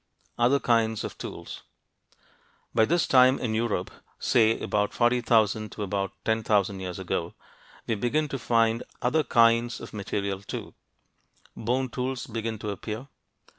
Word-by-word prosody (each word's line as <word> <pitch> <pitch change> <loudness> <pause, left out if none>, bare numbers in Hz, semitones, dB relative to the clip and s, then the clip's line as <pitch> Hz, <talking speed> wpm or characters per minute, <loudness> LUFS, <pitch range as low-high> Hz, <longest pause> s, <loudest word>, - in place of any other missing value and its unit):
OTHER 125 +4 +4
KINDS 115 -3 +1
OF - - -5
TOOLS - - -7 1.1
By 110 - +4
this 170 +5 +2
time 130 0 +6
in 115 -3 -2
Europe 115 0 -1 0.3
say 115 -1 +3
from - - -8
about 105 -1 0
40,000 115 -3 +2
to 105 - -4
about 100 -1 -2
10,000 105 -3 +1
years 90 -2 -5
ago - - -3 0.5
we - - 0
begin 125 +8 0
to 135 - -4
find 115 -1 +2 0.2
other 150 +6 +2
kinds 115 -1 +3
of - - -10
material 100 -1 -3
too. - - -7 0.8
Bone 125 +4 0
tools 125 +1 -3
begin 115 -1 -4
to 105 0 -4
appear. 110 +6 -6
115 Hz, 140 wpm, -27 LUFS, 105-125 Hz, 1.1 s, time